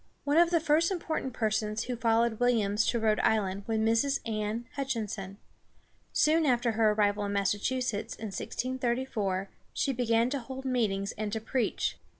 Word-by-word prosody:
One 290 +2 +1
of 340 0 +6
the 340 -1 +3
first 320 +1 +3
important 325 -7 -2
persons 215 -1 -1
who 250 - -3
followed 230 -1 +1
Williams 225 -4 +2
to 235 - +1
Rhode 220 -1 +2
Island 200 -2 +1
was 225 -1 0
Mrs. 230 +6 +2
Anne 215 +1 -2
Hutch´in 265 -6 -2
son. 195 -1 -7 0.7
Soon 320 +2 +3
after 240 -2 +2
her 220 0 +3
arrival 205 -1 +1
in 200 - -2
Massachusetts, 205 +3 -1
in 220 - -7
1634, 235 -5 -2 0.2
she 275 - 0
began 235 0 +2
to 280 - -1
hold 265 +2 -8
meetings 210 -6 0
and 215 -1 -2
to 220 - -1
preach. 240 +2 -1
230 Hz, 160 wpm, -29 LUFS, 210-260 Hz, 0.7 s, of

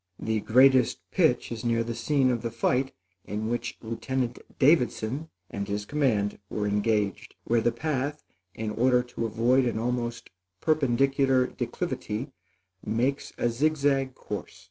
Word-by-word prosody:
The 110 -1 -1
greatest 130 +3 +5
pitch - - +2
is 115 -2 -5
near 115 -1 +1
the 115 0 -4
scene 135 +1 +2
of 120 -2 -1
the 115 - -2
fight 125 +3 0 0.3
in 105 +2 -3
which 120 0 -3
Lieutenant 120 +2 -2 0.2
Davidson 140 0 +2 0.2
and 100 0 -4
his 105 0 -3
command 115 -8 0
were 105 - -2
engaged, 105 -1 0
where 115 0 +2
the 120 - +2
path, 145 +2 -2 0.3
in 110 -1 -3
order 125 +2 +3
to 120 -2 -4
avoid 120 +4 +3
an 120 -2 -1
almost 120 0 -3 0.3
perpendicular 135 -3 +2
declivity, 120 +2 -4 0.5
makes 125 +6 -1
a - - +1
zig 155 +6 +1
zag 135 -2 +1
course. - - -7
120 Hz, 145 wpm, -27 LUFS, 110-135 Hz, 0.5 s, greatest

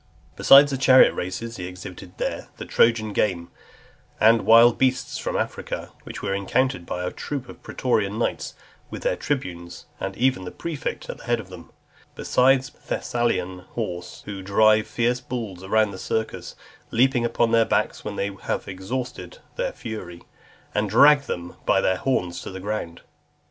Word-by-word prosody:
Besides 140 +1 +7
the 135 - -2
chariot 130 -1 +7
races, 115 +6 -5
he 90 -1 -5
exhibited 90 0 -10
there - - -3
the - - -7
Trojan 110 -2 +2
game, 90 -6 -1 0.7
and 115 +1 +4
wild 115 +1 +7
beasts 130 -1 0
from - - -2
Africa, - - -4
which - - -8
were 100 -1 -1
encountered 100 0 0
by 90 - -3
a 90 - -2
troop 140 -4 -5
of - - -12
pretorian 110 -5 -1
knights, 115 - -2 0.3
with - - -7
their - - +1
tribunes, 90 -12 -4
and 95 0 -4
even 125 -5 +1
the 90 - -5
prefect 165 -4 -5
at - - -7
the - - -13
head 120 -1 +1
of 100 -4 -9
them; 90 -3 -11 0.5
besides 130 0 +2
Thessalian 95 -7 -2
horse, 90 -2 -6
who 100 -2 -6
drive 110 +3 +3
fierce 120 +1 0
bulls 110 -8 -6
round 110 0 +2
the 95 - -8
circus, 110 +2 -3 0.3
leap 130 +4 +3
upon 120 -2 +1
their 115 0 +5
backs - - -1
when - - -5
they 100 +1 -2
have - - -3
exhausted 120 - -5 0.2
their - - -1
fury, 90 - -8 0.5
and 105 0 0
drag 140 +6 +6
them 85 0 -5
by - - +4
the 95 - +1
horns 90 -10 -1
to - - -7
the 95 - -7
ground. 100 -4 -4
110 Hz, 165 wpm, -24 LUFS, 95-125 Hz, 0.7 s, Besides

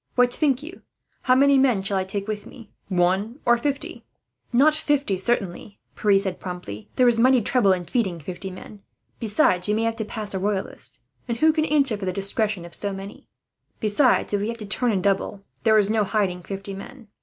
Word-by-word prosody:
What 245 -1 +3
think 275 -3 +1
you? 345 +5 -10 0.4
How 255 - +3
many 275 +1 +5
men 245 -8 +3
shall 195 +1 -2
I - - 0
take 200 +2 -4
with 210 -1 -4
me 230 -4 -14 0.2
one, 190 +7 0
or 240 - +5
fifty?" 275 +4 -3 0.5
"Not 280 +5 +5
fifty, 290 -8 +1
certainly," 195 -1 -2 0.2
Pierre 205 -2 +3
said 190 -2 -2
promptly. 180 - -7
"There 255 - +4
is 235 -1 +3
mighty 255 +2 +5
trouble 220 -2 +3
in 180 -1 0
feeding 190 -2 -1
fifty 185 +5 -6
men. 195 +2 -11 0.4
Besides, 205 -4 +1
you 210 - +1
may 225 - 0
have 230 0 -1
to 220 - -2
pass 215 -1 -6
as - - -2
a 190 - -2
Royalist, 195 -8 -4 0.3
and 235 - -2
who 315 +4 +4
can 310 -1 +1
answer 280 -8 +2
for 200 - -5
the 185 - 0
discretion 200 -1 -1
of 170 - -12
so 205 - -3
many? 195 +1 -9 0.5
Besides, 220 +2 +2
if 200 - +1
we 205 - -1
have 230 0 -4
to 215 - -7
turn 235 +4 0
and 190 -3 -1
double, 195 0 0 0.2
there 220 -1 +4
is 205 -2 +4
no 215 0 +2
hiding 195 -3 -1
fifty 195 +2 -6
men. 230 +5 -10
210 Hz, 210 wpm, -24 LUFS, 195-245 Hz, 0.5 s, many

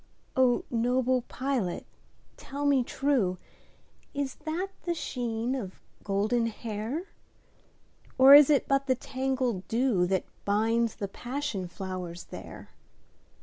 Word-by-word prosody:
O 255 -2 +3
noble 250 +2 +2
pilot 255 -9 -2 0.5
tell 285 +1 -5
me 275 -3 +4
trueIs 240 -9 0 1.1
that 345 +5 -2
the 345 -1 -2
sheen 240 -5 -2
of 205 -9 -5 0.2
golden 215 +4 +1
hair? 230 - -4 1.1
Or 265 +1 +9
is 290 0 +10
it 290 -2 +3
but 275 0 +1
the 260 - +3
tangled 260 -6 -2
dewThat 195 -7 +1 0.2
binds 225 +3 +1
the 200 - -4
passion 245 -3 -4
flowers 180 -1 -6
there? - - -9
245 Hz, 105 wpm, -28 LUFS, 205-270 Hz, 1.1 s, is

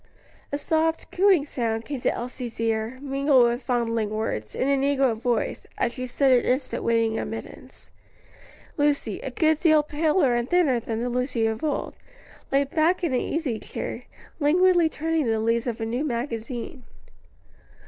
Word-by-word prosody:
A 285 - -1
soft, 320 +2 0
cooing 370 -5 +4
sound 230 -5 -2
came 280 -4 -5
to - - +2
Elsie's 245 -1 -6
ear, 225 +2 -1
mingled 275 -1 +3
with 240 +1 +1
fondling 230 -3 0
words, 210 - -3
in 260 - 0
a 280 - +3
negro 270 -3 +2
voice, 235 +1 -2
as 235 - 0
she 255 0 -5
stood 265 +2 +2
an 250 -1 +5
instant 255 +2 -1
waiting 230 -1 +1
admittance. 225 - -8 0.9
Lucy, 290 -8 0
a 270 - -5
good 315 +4 +2
deal 310 -3 +4
paler 300 -2 +2
and 240 +1 -1
thinner 335 -9 +3
than 225 -1 -4
the 245 - -1
Lucy 250 -2 0
of 220 +3 -2
old, 300 -2 -2 0.6
lay 275 +1 +4
back 320 +6 +1
in 320 -6 0
an 250 - +2
easy 280 -9 -2
chair, - - -6 0.3
languidly 345 +2 +4
turning 320 -3 -1
the 225 -1 +1
leaves 230 +2 0
of 235 -1 -3
a 225 - -2
new 240 +5 -2
magazine. 240 -1 -4
255 Hz, 165 wpm, -25 LUFS, 230-295 Hz, 0.9 s, an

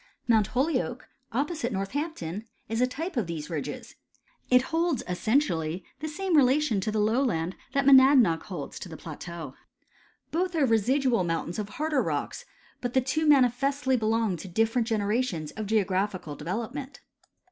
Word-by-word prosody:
Mount 220 -4 +4
Holyoke, 255 -1 -1 0.2
opposite 280 0 -1
Northampton, 205 - -4 0.2
is 225 +2 -1
a 250 - +4
type 325 +8 -5
of 220 -7 0
these 165 -1 -5
ridges. 150 -4 -5 0.5
It 250 0 +5
holds 330 -4 +1
essentially 180 - 0
the 310 - -4
same 360 +3 -1
relation 265 -5 +3
to 215 - -1
the 215 - -2
lowland 210 -6 +1 0.2
that 275 -1 +1
Monadnock 260 - +6
holds 175 -8 -6
to 185 - -8
the 160 - -8
plateau. 160 -2 -8 0.8
Both 355 +2 -1
are 305 -4 +3
residual 240 0 +2
mountains 170 +2 -2
of 205 -1 -4
harder 300 +4 0
rocks; - - -3 0.4
but 245 0 -3
the 260 - +5
two 305 +5 0
manifestly 270 0 +3
belong 220 -4 +1
to 190 - -8
different 225 +5 +1
generations 210 -7 -1
of 215 -1 -5
geographical 190 -6 0
development. 235 - -5
230 Hz, 145 wpm, -27 LUFS, 190-275 Hz, 0.8 s, Monadnock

